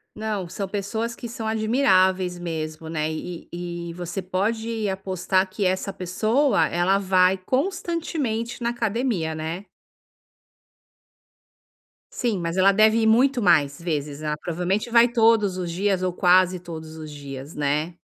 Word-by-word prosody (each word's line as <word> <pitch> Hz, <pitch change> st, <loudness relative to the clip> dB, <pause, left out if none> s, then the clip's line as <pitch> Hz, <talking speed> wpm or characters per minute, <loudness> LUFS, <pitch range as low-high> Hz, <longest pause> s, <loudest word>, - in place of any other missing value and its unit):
Não, 215 Hz, -4 st, -3 dB
são 195 Hz, +3 st, -5 dB
pessoas 220 Hz, +4 st, -3 dB
que -, -, -7 dB
são 225 Hz, -1 st, -6 dB
admiráveis 190 Hz, -6 st, +2 dB
mesmo, 160 Hz, -2 st, -5 dB
né. 155 Hz, -1 st, -1 dB
E 165 Hz, +2 st, -6 dB
e 175 Hz, 0 st, -5 dB
e -, -, -8 dB
você 175 Hz, +2 st, -4 dB
pode 220 Hz, +4 st, -2 dB
apostar 190 Hz, 0 st, 0 dB
que 195 Hz, +1 st, -3 dB
essa 185 Hz, +2 st, 0 dB
pessoa, 215 Hz, -, +1 dB
ela 180 Hz, +3 st, +2 dB
vai 185 Hz, -1 st, +3 dB
constantemente 275 Hz, -, -2 dB
na 235 Hz, -, +1 dB
academia, 225 Hz, -8 st, -1 dB
né. 160 Hz, +5 st, -5 dB, 2.5 s
Sim, 235 Hz, -, -1 dB
mas 170 Hz, +2 st, -3 dB
ela 195 Hz, +1 st, +6 dB
deve 215 Hz, +2 st, +4 dB
ir 220 Hz, -, +2 dB
muito 250 Hz, +4 st, +4 dB
mais 155 Hz, -7 st, +3 dB
vezes, 150 Hz, -3 st, -3 dB
né. 150 Hz, -1 st, -2 dB
Provavelmente 180 Hz, +8 st, -2 dB
vai 235 Hz, +1 st, +6 dB
todos 225 Hz, -5 st, +3 dB
os 175 Hz, -2 st, -3 dB
dias 190 Hz, +1 st, 0 dB
ou 185 Hz, -, 0 dB
quase 180 Hz, 0 st, +3 dB
todos 160 Hz, -2 st, -8 dB
os 155 Hz, -1 st, -8 dB
dias, 140 Hz, 0 st, -8 dB
né. 150 Hz, +3 st, -1 dB
185 Hz, 145 wpm, -24 LUFS, 170-220 Hz, 2.5 s, ela